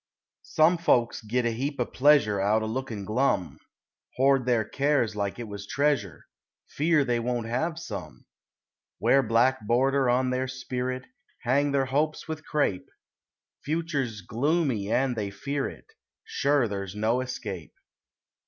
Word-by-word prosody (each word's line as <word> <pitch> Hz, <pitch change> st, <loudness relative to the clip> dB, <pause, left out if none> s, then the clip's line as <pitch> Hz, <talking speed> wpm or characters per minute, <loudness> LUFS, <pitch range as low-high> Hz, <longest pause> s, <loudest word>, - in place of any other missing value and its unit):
Some 165 Hz, +3 st, +3 dB
folks 120 Hz, -7 st, +2 dB
git 120 Hz, +3 st, -1 dB
a 120 Hz, -, +2 dB
heap 140 Hz, +5 st, -3 dB
o' 125 Hz, -, +2 dB
pleasure 125 Hz, -9 st, +3 dB
Out 105 Hz, +3 st, +2 dB
o' -, -, -1 dB
lookin' 110 Hz, -3 st, -4 dB
glum; 110 Hz, -5 st, 0 dB, 0.6 s
Hoard 135 Hz, -1 st, +3 dB
their 120 Hz, -3 st, +2 dB
cares 140 Hz, -4 st, +1 dB
like 100 Hz, -1 st, -2 dB
it 120 Hz, -2 st, -6 dB
was 100 Hz, -1 st, -8 dB
treasure 140 Hz, -, 0 dB, 0.4 s
Fear 155 Hz, -1 st, +2 dB
they 120 Hz, -2 st, +1 dB
won't 120 Hz, -1 st, -2 dB
have 155 Hz, +9 st, -1 dB
some. 100 Hz, -, -8 dB, 0.7 s
Wear 135 Hz, -, +4 dB
black 125 Hz, +2 st, +2 dB
border 135 Hz, +2 st, +2 dB
on 125 Hz, +1 st, +2 dB
their 130 Hz, +1 st, -1 dB
spirit; 130 Hz, 0 st, -4 dB, 0.4 s
Hang 140 Hz, +4 st, +2 dB
their 140 Hz, -1 st, +2 dB
hopes 150 Hz, +5 st, -1 dB
with 160 Hz, -1 st, -5 dB
crape; 145 Hz, -, -1 dB, 0.7 s
Future's 145 Hz, -9 st, -2 dB
gloomy 120 Hz, -, 0 dB
and 130 Hz, -1 st, +1 dB
they 105 Hz, -3 st, -2 dB
fear 140 Hz, +7 st, -3 dB
it, -, -, -13 dB, 0.4 s
Sure 140 Hz, -3 st, +1 dB
there's 100 Hz, -2 st, -5 dB
no 110 Hz, +4 st, +1 dB
escape. 105 Hz, -9 st, -6 dB
125 Hz, 145 wpm, -27 LUFS, 110-140 Hz, 0.7 s, Wear